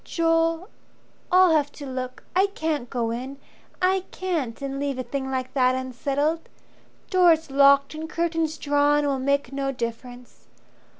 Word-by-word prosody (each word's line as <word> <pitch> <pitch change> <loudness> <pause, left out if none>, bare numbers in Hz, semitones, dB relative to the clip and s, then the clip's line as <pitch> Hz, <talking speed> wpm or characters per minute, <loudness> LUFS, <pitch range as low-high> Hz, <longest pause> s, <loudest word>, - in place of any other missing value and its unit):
"Joel, 330 +3 0 0.6
I'll 365 -1 +6
have 290 -1 +1
to 290 - -9
look. 255 -1 -6
I 385 +2 +4
can't 305 -6 -2
go 235 -3 -2
in, 260 +4 -5 0.5
I 380 +1 +3
can't, 325 -11 -3
and 275 -1 -4
leave 280 -2 -2
a 255 - -3
thing 265 +2 -4
like 260 -1 -3
that 255 -2 +3
unsettled. 280 +5 -2 0.6
Doors 335 -5 +4
locked 280 +1 +5
and 315 +1 -6
curtains 330 -1 -1
drawn 290 0 +2
will 275 -2 0
make 280 0 0
no 275 0 -1
difference. 245 0 -7
280 Hz, 145 wpm, -24 LUFS, 260-325 Hz, 0.6 s, I'll